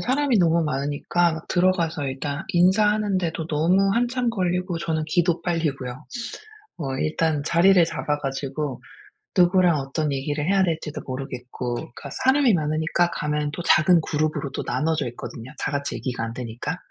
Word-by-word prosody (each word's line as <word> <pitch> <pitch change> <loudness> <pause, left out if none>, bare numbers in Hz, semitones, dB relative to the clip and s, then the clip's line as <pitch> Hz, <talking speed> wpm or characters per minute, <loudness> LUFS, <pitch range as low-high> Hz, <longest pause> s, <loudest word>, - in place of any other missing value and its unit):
사람이 265 -2 +2
너무 170 -2 +3
많으니까 150 +4 0
들어가서 170 -5 +1
일단 140 +4 -4
인사하는데도 190 -3 +2
너무 180 +6 +2
한참 245 +1 +1
걸리고 180 -3 -1
저는 160 -2 -1
기도 175 0 +1
빨리고요. 150 -6 -2 0.7
어 135 -5 -3
일단 155 -1 0
자리를 175 +2 +5
잡아 150 -2 -2
가지고 140 0 -4 0.6
누구랑 175 -3 +5
어떤 140 +2 -2
얘기를 145 +2 -2
해야 195 0 +3
될지도 160 -4 -2
모르겠고 125 -2 -5
그러니까 120 - -8
사람이 265 -2 +5
많으니까 160 +2 +1
가면 150 0 -1
또 175 - -4
작은 170 +1 +5
그룹으로 155 -2 -1
또 - - -3
나눠져 160 -3 0
있거든요 120 0 -8
다같이 140 0 -2
얘기가 125 -3 -4
안 115 - -5
되니까. 120 -2 -4
160 Hz, 360 characters per minute, -24 LUFS, 145-180 Hz, 0.7 s, 자리를